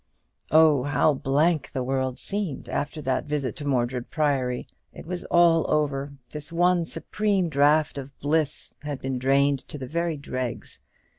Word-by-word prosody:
Oh, 155 -3 +6
how 145 +3 +2
blank 145 +3 +1
the 130 - -1
world 130 0 -1
seemed 195 -8 -4
after 150 +1 -3
that 130 -1 0
visit 145 -5 -2
to 145 - -5
Mordred 125 -2 -1
Priory! 135 -5 0 0.3
It - - -11
was 175 +1 -5
all 170 -2 +4
over. 145 -2 0 0.2
This 150 +1 -6
one 175 0 +3
supreme 195 0 -1
draught 150 0 +3
of 135 0 -10
bliss 150 0 -1
had 145 -3 -4
been 135 -1 -3
drained 140 +2 +3
to 150 - -7
the 135 - -6
very 170 +3 -2
dregs. 130 -3 -5
145 Hz, 155 wpm, -25 LUFS, 135-160 Hz, 0.3 s, Oh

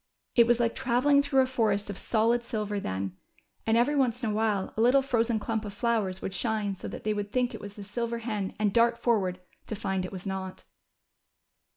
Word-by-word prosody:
It 235 -2 +6
was 240 0 +3
like 235 -1 +2
travelling 265 +4 +3
through 280 -2 +3
a - - +3
forest 220 -6 0
of 205 - -5
solid 235 +2 +2
silver 210 -3 -2
then, 95 - -3 0.5
and 225 +1 +4
every 260 +5 +3
once 250 -2 +1
in 220 - +1
a - - -2
while 210 -3 0
a 220 - 0
little 260 +4 +5
frozen 235 -3 +1
clump 225 0 -2
of 205 -2 -7
flowers 210 -5 0
would 190 - -3
shine 215 -2 -1
so 190 - -7
that - - -7
they 215 - +1
w'ould 205 -1 -3
think 250 0 +1
it - - -7
was 205 0 -8
the 205 - -8
silver 235 +3 -3
hen 215 -4 -3
and 210 -2 +1
dart 235 0 +4
forward, 195 -7 +1 0.3
to 215 - -3
find 190 -2 -2
it 185 - -5
was 190 0 -8
not. 190 -1 -5
220 Hz, 220 wpm, -28 LUFS, 200-240 Hz, 0.5 s, It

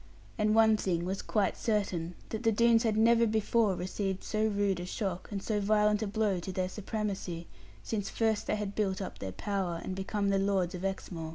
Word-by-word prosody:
And 215 -1 +2
one 220 -1 +6
thing 175 -4 -1
was 190 +2 -2
quite 205 -3 0
certain, 185 -6 -1
that 220 - -3
the 225 -2 +3
Doones 230 +1 +4
had 220 -3 +1
never 230 +1 +5
before 220 -1 +2
received 190 +1 -3
so 215 0 0
rude 200 -3 +1
a 175 - -4
shock, 185 -1 -3
and 200 -1 -4
so 215 -2 0
violent 210 +1 +3
a 215 - -1
blow 200 -2 0
to 180 +2 -5
their 185 0 -1
supremacy, 195 -4 -4 0.4
since 205 -3 -2
first 220 -2 0
they - - +1
had 205 -1 -3
built 195 -3 0
up 195 - -6
their 95 - -4
power, 185 - -2
and 185 - -4
become 200 +1 -1
the 195 0 +2
Lords 195 -2 +1
of 180 0 -6
Exmoor. 180 -4 -4
200 Hz, 205 wpm, -31 LUFS, 185-215 Hz, 0.4 s, one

